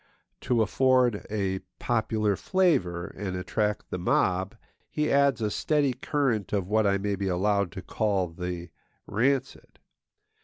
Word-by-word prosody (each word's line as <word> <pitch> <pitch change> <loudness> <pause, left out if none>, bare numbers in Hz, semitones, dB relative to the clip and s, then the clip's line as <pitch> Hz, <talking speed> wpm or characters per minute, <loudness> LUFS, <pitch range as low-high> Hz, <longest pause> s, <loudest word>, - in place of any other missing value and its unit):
To 120 -3 +2
afford 125 -1 +2
a 100 -3 -1 0.2
popular 105 -2 0
flavour 95 - +1
and 95 -3 -4
attract 105 +3 -2
the 90 - -3
mob, 95 +1 +1 0.3
he 150 0 -1
adds 140 -4 +3
a 105 - 0
steady 145 +2 +1
current 125 -6 -1
of 100 -3 0
what 110 +1 +2
I 100 0 +3
may 100 +1 -1
be 100 0 -3
allowed 100 +1 +1
to 95 - -7
call 100 -3 0
the 90 0 -6 0.3
rancid. 130 +5 -1
105 Hz, 140 wpm, -27 LUFS, 95-125 Hz, 0.3 s, adds